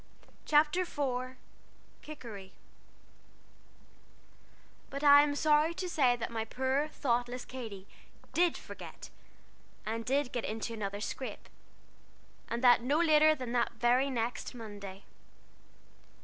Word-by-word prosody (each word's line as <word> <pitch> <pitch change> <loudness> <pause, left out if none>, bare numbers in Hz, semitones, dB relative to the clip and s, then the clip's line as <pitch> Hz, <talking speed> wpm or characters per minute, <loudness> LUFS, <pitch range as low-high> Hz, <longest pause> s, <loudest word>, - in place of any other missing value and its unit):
'" - - -29
CHAPTER 300 +4 +4
IV 260 -6 -3 0.7
KIKERI 220 -10 -9 2.4
But 280 +1 -5
I 285 0 +9
am 290 -1 +1
sorry 305 +2 +3
to 365 - -3
say 265 -8 +3
that 235 -1 -5
my 225 -1 -2
poor, 265 +5 -1
thoughtless 245 -4 -2
Katy 220 -7 -8 0.5
did 345 0 +2
forget, - - -10 0.7
and 225 +1 -3
did 270 +2 0
get 240 - -3
into 225 +2 -4
another 205 -2 -4
scrape, 260 +4 -5 1.0
and 235 +2 -3
that 245 -2 +7
no 275 +5 +1
later 310 -2 +5
than 255 -4 -6
the 240 -1 +2
very 245 +4 +3
next 240 0 -3
Monday. 205 -4 -9
255 Hz, 120 wpm, -31 LUFS, 230-295 Hz, 2.4 s, I